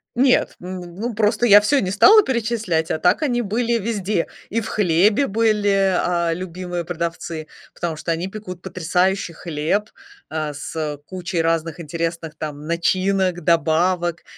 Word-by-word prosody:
Нет, 255 +1 +3
м, 180 -1 -8
ну, 230 +5 -3
просто 215 +2 +1
я 205 -2 +8
всё 275 +7 +2
не 185 - -2
стала 410 - +7
перечислять, 225 - -1
а - - 0
так 180 - +2
они 245 -5 +1
были 235 +3 -1
везде. 210 -4 -1 0.2
И 230 - 0
в 225 - -5
хлебе 205 - +2
были, 205 -3 +2
а, 170 -2 +1
любимые 180 0 -5
продавцы, 165 -1 -4 0.3
потому 170 -2 -3
что 160 +2 -3
они 165 +3 -2
пекут 190 -3 -8
потрясающий 185 +1 0
хлеб, 165 +6 -2 0.4
а, 155 -2 -3
с, 145 - -7
э, 150 -2 -2
кучей 180 -1 -3
разных 165 0 -1
интересных 165 0 -4
там 150 -1 -6
начинок, 185 +2 0
добавок: 170 +1 +1
180 Hz, 150 wpm, -21 LUFS, 165-210 Hz, 0.4 s, я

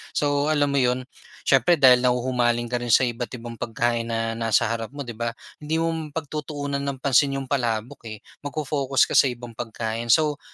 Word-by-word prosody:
So 145 0 +1
alam 145 -2 +2
mo 140 - +2
'yon 125 0 +1 0.4
siyempre 135 +6 +4
dahil 130 -5 +6
nahuhumaling 125 -1 +1
ka 120 - 0
rin 120 -2 0
sa - - +6
iba't 120 -1 -2
ibang 115 -1 -9
pagkain 115 +1 -1
na 115 0 -2
nasa 115 -1 +2
harap 115 -1 -3
mo, 145 - -4
'di 120 -4 -8
ba, 115 0 -2 0.2
hindi 160 +2 -1
mo 165 - +1 0.2
pagtutuunan 145 -2 -4
ng 140 -1 -3
pansin 140 +1 +3
'yong 135 - -9
palabok, 115 -3 -2
eh, 110 -1 -9 0.2
mag-fo-focus 140 -2 0
ka - - -3
sa - - +5
ibang 120 -1 -6
pagkain. 115 0 -4
So 150 +5 +3
125 Hz, 190 wpm, -24 LUFS, 115-140 Hz, 0.4 s, dahil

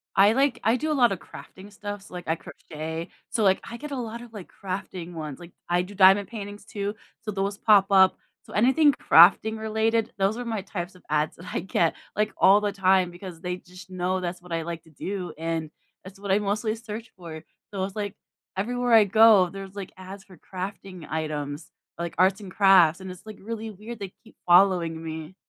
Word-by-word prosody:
I 200 +3 +6
like 270 +1 +2
I 225 +2 +3
do 310 +4 -2
a - - +2
lotta 240 -8 +3
crafting 190 +3 -13
stuff, 205 -1 -7
so, - - -16
like, 175 -1 -7
I 160 - +1
crochet, 160 +1 -7 0.2
so, 225 - 0
like, 190 -1 +4
I 235 - -7
get 300 +3 -8
a - - -2
lotta, 235 -1 -6
like, 205 -5 -9 0.2
crafting 185 -2 -5
ones. 155 -3 -6
Like, 175 0 -12 0.2
I 175 0 +3
do 190 +3 -8
diamond 195 +1 +6
paintings, 205 -2 -8
too, 205 0 -4 0.3
so 215 - -4
those 200 0 -2
pop 205 -3 +5
up. 190 -1 +6 0.3
So - - -13
anything 265 +7 +4
crafting-related, 220 +4 +4
those 195 +3 +1
are 245 - -4
my 225 -3 -2
types 185 -2 -6
of 180 - -18
ads 150 0 0
that 180 +2 -12
I - - -1
get, 170 -2 +1 0.2
like, 210 +1 0
all 200 +2 +6
the 205 -1 0
time 190 -2 +3
because 175 -1 -10
they 180 -1 -3
just 180 +1 -14
know 185 0 -1
that's 175 0 -5
what 180 -1 -15
I 165 -1 -1
like 170 0 -6
to - - -20
do, 185 +5 -5
and 165 -1 -3 0.3
that's 190 +1 -12
what 200 -1 -3
I 195 - +4
mostly 210 +2 -1
search 225 0 -8
for. 160 -3 -9 0.3
So 190 -1 -2
it's 190 0 -5
like, 205 -1 -4 0.4
everywhere 245 +4 0
I 220 -2 +8
go, 210 -2 +6
there's, 195 +1 -9
like, 200 -2 -7
ads 190 +1 -10
for 185 -2 -16
crafting 185 -2 -8
items, 155 -1 -4 0.3
like 170 0 -5
arts 190 +3 +3
and 195 -2 -9
crafts, 185 -4 +5
and 190 - -7
it's, 180 +2 -11
like, 215 -1 -9
really 220 +1 -6
weird. 215 +3 -9
They 195 -2 -7
keep 225 - -19
following 175 -3 +4
me. 160 +2 -7
195 Hz, 210 wpm, -25 LUFS, 175-210 Hz, 0.4 s, I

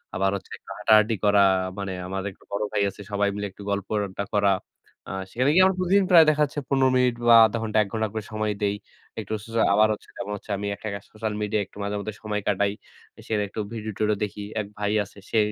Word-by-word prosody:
আবার 95 +1 +2
হচ্ছে 100 - -8
একটু - - -20
হাঁটাহাঁটি 110 +1 +4
করা 100 -1 +5 0.4
মানে 100 -1 -3 0.2
আমার 95 +1 -3
একটু - - -21
বড় 100 +1 -1
ভাই 105 - 0
আছে, 100 - -12
সবাই 100 0 +1
মিলে 105 0 -3
একটু 100 - -14
গল্প-আড্ডা 100 0 -2
করা। 100 -1 +3 0.6
আ - - -6 0.2
সেখানে 130 +4 +1
গিয়ে 185 +3 +6
আমার 190 0 +2
প্রতিদিন 190 +2 +3
প্রায় 165 -3 +9
দেখাচ্ছে, 150 -1 +1
১৫ 135 -1 +3
মিনিট 125 -1 +3
বা 120 - +9
০.৫ 115 - -1
ঘন্টা, 110 -1 -1
১ - - -8
ঘণ্টা 110 -1 0
করে 110 -1 -3
সময় 110 0 -1
দেই। 100 0 +1 0.4
একটু 110 0 -5
সো 115 +1 -3
আবার 105 +2 +5
হচ্ছে 105 - -11
যেমন 105 - -5
হচ্ছে, 105 - -10
আমি 100 +1 -4
একটা 110 - -8
কাজ, 100 - -6
সোশ্যাল 110 0 -3
মিডিয়ায় 105 0 0
একটু - - -18
মাঝে-মধ্যে 100 +1 -3
সময় 105 -1 -2
কাটাই। 100 0 +2 0.6
সেটা 105 -2 0
একটু 100 - -7
ভিডিও-টিডিও 110 -1 -1
দেখি। 105 0 -4 0.2
এক 100 - -7
ভাই 105 0 0
আছে। 100 - -16
সে - - 0
105 Hz, 215 wpm, -25 LUFS, 100-110 Hz, 0.6 s, প্রায়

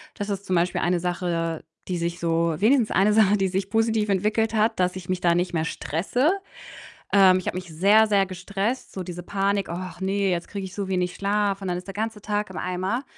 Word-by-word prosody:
Das 205 0 -5
ist 200 0 -3
zum 185 - 0
Beispiel 175 +1 +1
eine 175 0 +1
Sache, 170 -2 -2 0.2
die 180 -2 -2
sich 170 +1 -3
so 165 -1 +1
wenigstens 230 +2 +3
eine 205 +2 +3
Sache, 210 -1 +5
die 195 -1 +1
sich 190 +1 -2
positiv 220 -1 +1
entwickelt 215 +3 +1
hat, 220 -1 +1
dass 180 0 +1
ich 180 -2 -8
mich 185 -1 -1
da 170 -1 +3
nicht 175 0 0
mehr 160 -1 0
stresse. 195 - 0 0.8
Ähm, 190 -2 +6
ich 185 - -8
habe - - -2
mich 185 -1 -6
sehr, 200 +7 +4
sehr 200 -2 +3
gestresst, 195 +6 -3
so 190 - -5
diese 175 0 -7
Panik: 200 +1 -1
„Ach 180 +2 -6
ne, 195 +1 0
jetzt 175 -1 -2
kriege 200 -1 -5
ich 185 - -8
so 200 -2 -4
wenig 180 -1 -1
Schlaf, 200 0 0
und 190 - -3
dann 175 - -1
ist 180 - -10
der 195 - -6
ganze 220 0 -3
Tag 210 0 -2
im - - -9
Eimer.“ 185 +8 -2
190 Hz, 230 wpm, -24 LUFS, 180-210 Hz, 0.8 s, Ähm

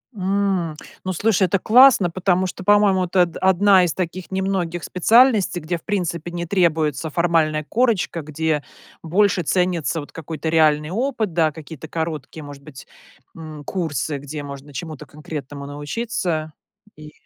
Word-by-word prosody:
М, 190 -4 -1 0.3
ну, 185 - -2
слушай, 205 +2 +2
это 190 +1 +2
классно, 235 -3 +6
потому 185 +1 +1
что, 185 - -7
по-моему, 205 -1 +4
это 180 +1 +2
од 170 -2 -5
одна 190 0 +4
из 170 -3 0
таких 185 0 -5
немногих 190 -3 -2
специальностей, 215 -1 +3
где 170 +3 -2
в - - -19
принципе 175 -5 -3
не 170 0 -4
требуется 160 -4 +1
формальная 160 -2 +1
корочка. 220 - 0
Где 155 0 -2 0.4
больше 185 +2 +2
ценится 175 -1 0
вот 145 - -9
какой-то 160 0 -5
реальный 155 -2 +3
опыт, 225 -1 -2
да, 160 -2 +2
какие-то 160 0 -10
короткие, 160 -2 -5
может 145 -1 -11
быть, 140 -2 -12 0.5
м, 155 -2 -9
курсы, 155 -5 -2
где 145 +2 -7
можно 140 0 -9
чему-то 155 -1 -7
конкретному 145 -2 -8
научиться 155 +1 -3 0.4
и 155 0 -12
170 Hz, 145 wpm, -21 LUFS, 155-190 Hz, 0.5 s, классно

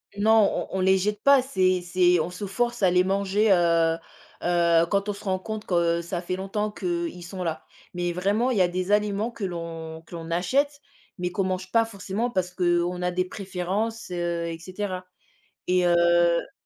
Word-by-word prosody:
Non 215 0 +3
on 190 - -2
on - - 0
les 190 +1 +4
jette 210 +2 -1
pas, 280 -2 +6
c'est 185 -8 +1
c'est 180 0 +3
on 165 - -3
se 180 +3 -6
force 240 +4 -1
à 185 - +5
les 180 0 +4
manger, 200 +2 +1
heu 170 -2 +3 0.5
heu, 170 -1 +3
quand 200 0 0
on - - 0
se 200 - -12
rend 190 -2 0
compte 215 +2 -6
que 170 -1 +1
ça 170 +1 -4
fait 185 +1 -3
longtemps 210 +2 -2
qu'ils 175 -2 -3
sont 185 +1 -6
là, 165 -2 -4 0.3
mais 175 -1 -2
vraiment 205 +7 +1
il 225 - 0
y - - +4
a 180 - +5
des 185 +2 -2
aliments 210 +2 +1
que 220 - -8
l'on 165 -2 -5
que 175 - -9
l'on 165 0 -7
achète 280 +12 +1 0.4
mais 180 0 -2
qu'on 195 +2 -1
mange 185 0 -3
pas 230 -1 +4
forcément 210 +2 -3
parce 185 -5 -1
qu'on 175 0 0
a 180 - +1
des 185 +1 0
préférences, 195 +4 -3
heu, 170 -1 -2
et 165 0 -5
cetera, 185 +1 -5 0.6
et 180 0 +3
heu 170 0 +3
185 Hz, 200 wpm, -25 LUFS, 175-205 Hz, 0.6 s, pas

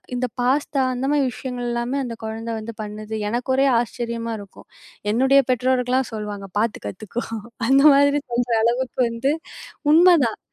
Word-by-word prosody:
இந்த 250 +1 -1
பாஸ்தா, 275 +2 +1
அந்த 260 +2 -2
மாதிரி 290 -2 +2
விஷயங்கள்ல்லாமே 245 0 -3
அந்த 230 -2 -6
கொழந்தை 225 +1 -4
வந்து 225 +1 -7
பண்ணுது. 215 +1 -6
எனக்கு 240 +3 -2
ஒரே 270 - +3
ஆச்சரியமா 230 -1 -3
இருக்கும். 200 -1 -14 0.4
என்னுடைய 265 +4 +4
பெற்றோர்கள்லாம் 255 0 +1
சொல்லுவாங்க. 205 -2 -5
பார்த்து 225 - -2
கத்துக்கோ. 215 - -5 0.5
அந்த 275 +1 +6
மாதிரி 285 +1 +3
சொல்ற 240 0 -1
அளவுக்கு 245 +3 0
வந்து, 230 +5 0 0.6
உண்மதான். 330 -9 +5
245 Hz, 135 wpm, -22 LUFS, 230-265 Hz, 0.6 s, அந்த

